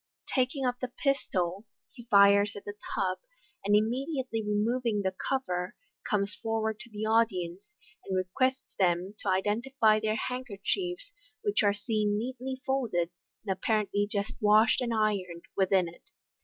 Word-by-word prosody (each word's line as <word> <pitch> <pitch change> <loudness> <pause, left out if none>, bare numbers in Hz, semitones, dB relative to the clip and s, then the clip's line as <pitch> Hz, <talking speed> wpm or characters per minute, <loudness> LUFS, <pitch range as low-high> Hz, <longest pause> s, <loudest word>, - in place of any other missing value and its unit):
Taking 260 +1 +1
up 245 0 0
the 255 - -2
pistol, 210 -8 -1 0.3
he 240 -4 -12
fires 200 0 +6
at 200 - -9
the 205 - -5 0.2
tub, 185 -1 0 0.4
and 205 +1 +3
immediately 255 +2 0
removing 210 +1 0
the 190 0 0 0.2
cover, 180 -10 -1 0.3
comes 205 -3 +1
for 225 -1 0
ward 220 -1 -1
to - - -10
the 215 -1 -4
audience, 205 -4 0 0.3
and 190 -1 -2
requests 255 +9 0
them 180 +1 +2
to 200 - -2
identify 215 +4 +2
their 215 0 0
hand 250 +3 -3
kerchiefs, 360 - -3 0.3
which 415 -2 +2
are 205 -1 +3
seen 210 -1 0
neatly 260 +3 -4
folded, 225 -11 0 0.3
and 195 -2 0
apparently 205 0 0
just 200 -1 -1
washed 215 +3 +5
and 240 -2 -1
ironed, 200 -6 0
within 190 -2 +3
it. 170 - -12
215 Hz, 150 wpm, -29 LUFS, 200-250 Hz, 0.4 s, fires